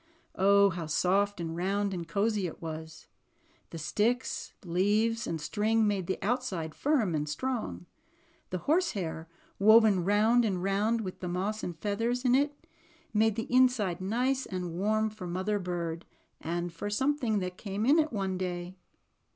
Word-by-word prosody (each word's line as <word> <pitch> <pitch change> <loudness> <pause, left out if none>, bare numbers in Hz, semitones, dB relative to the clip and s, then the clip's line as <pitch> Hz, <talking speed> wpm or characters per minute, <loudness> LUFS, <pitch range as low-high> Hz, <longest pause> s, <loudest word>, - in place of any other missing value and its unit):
Oh, 200 +1 +5
how 165 -2 -5
soft 195 +5 +1
and 165 -1 -4
round 195 +3 0
and 170 -2 -5
cozy 200 +2 0
it 160 - -9
was! 160 -1 -7 0.6
The 165 - -7
sticks, 225 +10 -1
leaves, 210 +6 +1
and 165 -1 -2
string 220 +7 +1
made 200 -4 0
the 190 - -1
out 245 +5 +1
side 165 -9 -4
firm 260 - +1
and 150 -1 -1
strong. 150 - -3 0.6
The 185 - -2
horsehair, 195 - 0 0.3
woven 215 -2 +6
round 215 +5 +4
and 190 -5 -1
round, 210 +4 +1
with 185 -4 -6
the 180 - -4
moss 200 +5 -2
and 175 -2 -5
feathers 230 +7 -1
in 250 - +4
it, 290 +4 +1 0.5
made 220 0 +3
the 225 +2 -4
inside 230 -9 +3
nice 250 +7 0
and 180 -4 -4
warm 215 +4 +1
for 210 -4 -8
Mother 190 +4 -1
Bird, 170 -3 -4 0.3
and 170 +1 -3
for 185 +5 -4
something 265 +1 0
else 200 - +1
that 180 0 -4
came 205 +1 -3
in 295 +6 +5
it 310 0 +1
one 190 -4 -2
day. 180 0 -4
200 Hz, 165 wpm, -30 LUFS, 175-225 Hz, 0.6 s, woven